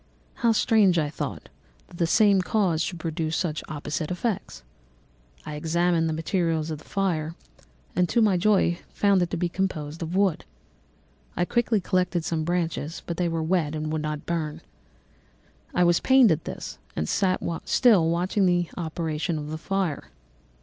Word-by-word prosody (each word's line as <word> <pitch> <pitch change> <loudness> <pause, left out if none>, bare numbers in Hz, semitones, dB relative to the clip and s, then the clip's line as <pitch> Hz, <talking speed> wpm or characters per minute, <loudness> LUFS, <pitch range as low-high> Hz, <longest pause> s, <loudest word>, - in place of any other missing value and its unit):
How 235 -2 +4
strange, 215 -5 +4
I 150 -2 0
thought, - - -5 0.4
that 175 - -13
the 170 - +1
same 200 +1 +4
cause 180 -5 +1
should 175 0 -3
produce 160 0 -2
such 155 -4 -2
opposite 155 +1 -3
effects! 180 - -3 0.8
I 150 - -6
examined 165 +2 +1
the - - -1
materials 165 -1 -1
of 155 - -4
the - - -15
fire, 165 -5 -1 0.6
and 180 -1 +2
to 235 - +2
my 210 -4 +4
joy 180 -2 +2
found 200 -2 +2
it 175 - 0
to 175 - -3
be 175 +1 0
composed 165 -4 -3
of 165 +2 -4
wood. 195 -4 +2 0.9
I 175 - +2
quickly 235 +1 +1
collected 180 -3 0
some 160 -2 -1
branches, 165 -2 -2
but 170 - -4
they 175 -1 +1
were 165 -1 -1
wet 160 -3 0
and 155 0 -3
would 155 - -1
not 150 -1 -4
burn. 160 -3 -3 1.1
I 180 - +2
was 175 -1 +4
pained 260 -4 +5
at 160 0 -1
this - - -7 0.2
and 80 - -2
sat 185 - +1 0.2
still 205 -10 +4
watching 185 +4 +1
the 175 -1 +1
operation 160 -1 -2
of 150 0 -5
the 155 - -3
fire. 190 -4 -2
170 Hz, 170 wpm, -25 LUFS, 160-185 Hz, 1.1 s, pained